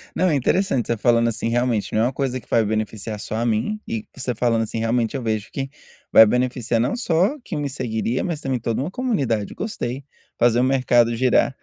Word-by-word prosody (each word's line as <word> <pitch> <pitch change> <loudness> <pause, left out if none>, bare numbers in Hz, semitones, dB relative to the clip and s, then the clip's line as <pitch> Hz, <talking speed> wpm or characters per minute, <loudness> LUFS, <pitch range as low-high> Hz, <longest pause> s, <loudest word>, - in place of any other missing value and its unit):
Não, 185 - +2
é 150 - +2
interessante 140 - +1
você 115 - 0
falando 115 +1 +3
assim 115 0 -3
realmente, 120 -2 0
não 110 - +2
é - - +3
uma 130 - -1
coisa 130 -1 -2
que - - -22
vai 115 - +3
beneficiar 110 0 -3
só 110 - -5
a 115 - -1
mim 120 - 0
e 225 -1 -4
você 125 -3 -3
falando 115 -1 +1
assim 115 +1 -4
realmente 115 +2 0
eu 135 - -2
vejo 110 -1 -2
que 135 0 -4 0.4
vai 110 - +9
beneficiar 125 0 0
não 120 - 0
só 200 - +1
quem 175 - -5
me 145 - -2
seguiria, 120 -2 -2
mas 165 -4 -3
também 130 -3 -1
toda 115 +1 -2
uma 155 +6 -3
comunidade, 140 - -1
gostei, 135 - -4 0.3
fazer 120 0 +3
o - - +3
mercado 125 -3 +3
girar. 130 +2 +2
120 Hz, 215 wpm, -22 LUFS, 115-135 Hz, 0.4 s, vai